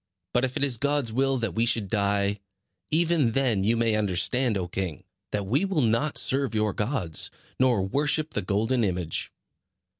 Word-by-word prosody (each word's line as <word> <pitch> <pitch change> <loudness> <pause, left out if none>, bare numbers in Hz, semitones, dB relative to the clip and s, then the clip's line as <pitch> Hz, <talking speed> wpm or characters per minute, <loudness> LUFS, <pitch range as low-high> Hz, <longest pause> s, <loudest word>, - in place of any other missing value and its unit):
But 125 - +2
if 130 -1 -1
it - - 0
is 135 -4 +2
God's 140 -3 0
will 135 +2 +1
that 115 -1 -2
we 115 - +1
should 115 -3 +2
die, 100 0 0 0.5
even 160 -6 +2
then 120 -7 +1
you 115 +3 +2
may 115 -1 +2
understand, 105 +4 +1
O 90 -2 -3
king, 90 -4 -4 0.3
that 100 -1 -2
we 130 - +1
will 190 -8 +1
not 120 +7 +1
serve 135 -3 +1
your 105 -2 +1
gods, 105 - -1 0.3
nor 125 -6 +3
worship 150 +8 0
the 105 - -1
golden 110 +6 0
image." 90 -5 -1
115 Hz, 175 wpm, -26 LUFS, 100-135 Hz, 0.5 s, nor